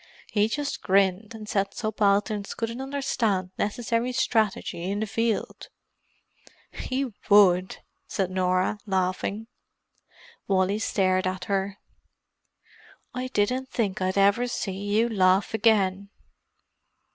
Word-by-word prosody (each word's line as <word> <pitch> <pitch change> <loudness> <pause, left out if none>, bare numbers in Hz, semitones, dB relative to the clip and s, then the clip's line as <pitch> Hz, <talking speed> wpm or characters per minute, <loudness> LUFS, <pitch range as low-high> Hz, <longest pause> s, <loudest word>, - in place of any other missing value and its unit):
He 210 0 +3
just 285 +5 -3
grinned 195 +3 +1
and 215 -1 -9
said 200 -1 -1
subalterns 205 -1 0
couldn't 230 +2 -4
understand 230 -9 -1
necessary 230 +3 -1
strategy 220 -8 0
in 200 +1 -1
the 220 - -1
field!" 225 +1 -2 1.0
"He 260 -2 -3 0.2
would!" 185 -3 +5 0.3
said 190 -2 -2
Norah, 185 +2 +1
laughing. 190 +3 -1 1.0
Wally 195 +1 +1
stared 185 -3 +1
at 185 -1 -3
her. 195 0 -1 1.4
"I 250 +1 -3
didn't 255 +2 0
think 205 -8 -2
I'd 185 +1 0
ever 200 +5 +4
see 230 -4 -3
you 205 +4 0
laugh 190 -2 +2
again!" 200 -3 +2
205 Hz, 110 wpm, -26 LUFS, 190-225 Hz, 1.4 s, would